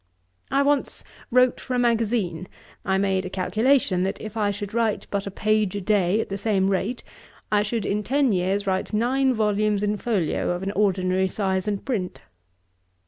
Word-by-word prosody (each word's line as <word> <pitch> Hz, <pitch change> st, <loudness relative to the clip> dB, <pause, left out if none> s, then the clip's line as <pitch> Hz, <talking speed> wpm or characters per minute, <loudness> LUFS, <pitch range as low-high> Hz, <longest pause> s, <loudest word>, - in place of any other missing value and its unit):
I 275 Hz, +1 st, +2 dB
once 285 Hz, 0 st, 0 dB, 0.3 s
wrote 250 Hz, 0 st, +3 dB
for 255 Hz, -, -4 dB
a -, -, +1 dB
magazine: 225 Hz, -7 st, 0 dB, 0.4 s
I 190 Hz, 0 st, +1 dB
made 190 Hz, -1 st, +1 dB
a 185 Hz, -, -5 dB
calculation, 210 Hz, +1 st, +1 dB
that 190 Hz, +1 st, -2 dB
if 215 Hz, 0 st, -8 dB
I 210 Hz, -2 st, +1 dB
should 205 Hz, 0 st, -5 dB
write 225 Hz, -2 st, 0 dB
but 200 Hz, 0 st, -2 dB
a -, -, -2 dB
page 215 Hz, 0 st, 0 dB
a -, -, -1 dB
day, 195 Hz, 0 st, +2 dB
at -, -, -6 dB
the 195 Hz, 0 st, -4 dB
same 195 Hz, -2 st, +1 dB
rate, 200 Hz, +6 st, -2 dB, 0.5 s
I 210 Hz, -1 st, +4 dB
should, 215 Hz, +1 st, -2 dB
in 210 Hz, +1 st, 0 dB
ten 270 Hz, +3 st, +1 dB
years, 195 Hz, +2 st, 0 dB
write 190 Hz, +2 st, -1 dB
nine 260 Hz, +5 st, +2 dB
volumes 210 Hz, -1 st, +1 dB
in 210 Hz, 0 st, 0 dB
folio, 205 Hz, -8 st, -1 dB
of 175 Hz, -, -6 dB
an 195 Hz, -, -2 dB
ordinary 190 Hz, -2 st, +1 dB
size 190 Hz, -1 st, -1 dB
and 205 Hz, -2 st, -2 dB
print.' 200 Hz, -9 st, -3 dB
205 Hz, 185 wpm, -24 LUFS, 190-225 Hz, 0.5 s, I